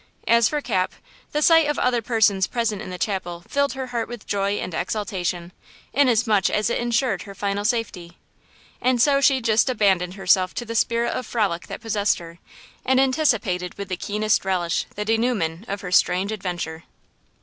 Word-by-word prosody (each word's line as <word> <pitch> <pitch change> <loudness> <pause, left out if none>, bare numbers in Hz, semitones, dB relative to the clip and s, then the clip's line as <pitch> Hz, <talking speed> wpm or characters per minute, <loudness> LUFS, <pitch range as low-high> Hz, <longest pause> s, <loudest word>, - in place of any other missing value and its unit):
As 235 -1 +5
for 300 -1 -2
Cap, 190 -8 -1 0.4
the 300 +1 0
sight 325 -1 +6
of 295 - -1
other 245 -2 +1
persons 220 -4 +2
present 230 -4 -2
in 215 - -7
the 180 - -6
chapel 175 -3 -3
filled 280 0 0
her 265 0 -4
heart 230 -1 -1
with 240 -2 -9
joy 200 0 0
and 185 - -4
exultation, 180 -2 -3 0.4
inasmuch 230 -7 +3
as 215 +2 0
it - - 0
insured 240 -2 0
her 200 -1 -10
final 200 +1 -2
safety. 205 -7 -2 0.6
And 255 -1 +2
so 275 +3 +4
she 270 -1 +4
just 225 +2 +2
abandoned 190 -6 +1
herself 185 -1 +2
to 240 - -4
the 230 - -5
spirit 235 +2 +1
of 250 - -4
frolic 200 -7 -1
that - - -7
possessed 210 -3 +1
her, 170 0 -11 0.4
and 260 0 +3
anticipated 230 - +1
with 200 -1 -6
the 185 - -1
keenest 210 +3 0
relish 180 -3 -1
the 210 - -3
dénouement 220 -6 -1
of 200 0 -3
her 180 - -6
strange 185 +2 +2
adventure. 175 -5 -5
210 Hz, 180 wpm, -23 LUFS, 185-240 Hz, 0.6 s, sight